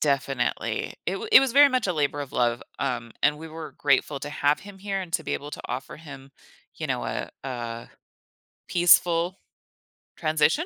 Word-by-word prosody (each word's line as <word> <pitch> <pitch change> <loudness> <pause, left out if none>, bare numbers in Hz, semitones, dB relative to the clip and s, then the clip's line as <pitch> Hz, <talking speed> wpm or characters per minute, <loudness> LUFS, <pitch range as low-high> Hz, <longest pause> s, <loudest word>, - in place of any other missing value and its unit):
Definitely. 135 -3 -1
It - - -1
wa - - -6
it - - +11
was 270 -3 0
very 285 +1 +8
much 255 -5 0
a 180 - +1
labor 145 -2 0
of 140 - -6
love, 120 -1 +1 0.2
um, 115 -1 -2
and 150 +1 +3
we 160 0 -8
were 160 0 -8
grateful 140 0 +2
to 145 - -5
have 145 0 +1
him 200 -1 -11
here 195 0 -3
and 180 -3 -7
to 160 - 0
be - - -3
able 145 - -5
to - - -7
offer 130 - -5
him, 140 -3 -11 0.4
you - - -4
know, - - -2
a 65 -1 -4
a 120 -3 -5 0.8
peaceful 175 +1 +4 0.8
transition? 155 - +2
150 Hz, 185 wpm, -26 LUFS, 135-180 Hz, 0.8 s, it